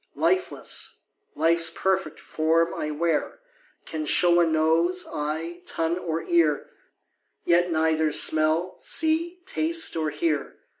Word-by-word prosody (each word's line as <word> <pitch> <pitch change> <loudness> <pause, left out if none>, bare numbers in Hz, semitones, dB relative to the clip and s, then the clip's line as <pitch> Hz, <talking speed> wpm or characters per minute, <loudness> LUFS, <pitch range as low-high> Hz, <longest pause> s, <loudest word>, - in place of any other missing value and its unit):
Lifeless, 370 0 -1 0.4
life's 165 0 +3
perfect 190 0 -2
form 165 +2 0
I 150 - -4
wear, 160 +1 -1 0.5
Can 155 -1 -5
show 175 +2 +4
a 170 - +3
nose, 165 +3 +1
eye, 160 +4 -4
tongue, 165 +2 -2
or 165 -2 -3
ear, 160 -4 +1 0.7
Yet 175 +1 +3
neither 160 -1 +1
smell, 155 +4 +2
see, 335 +3 +1
taste, 330 -2 0
or 160 -1 -1
hear. 335 - -2
165 Hz, 115 wpm, -25 LUFS, 160-180 Hz, 0.7 s, show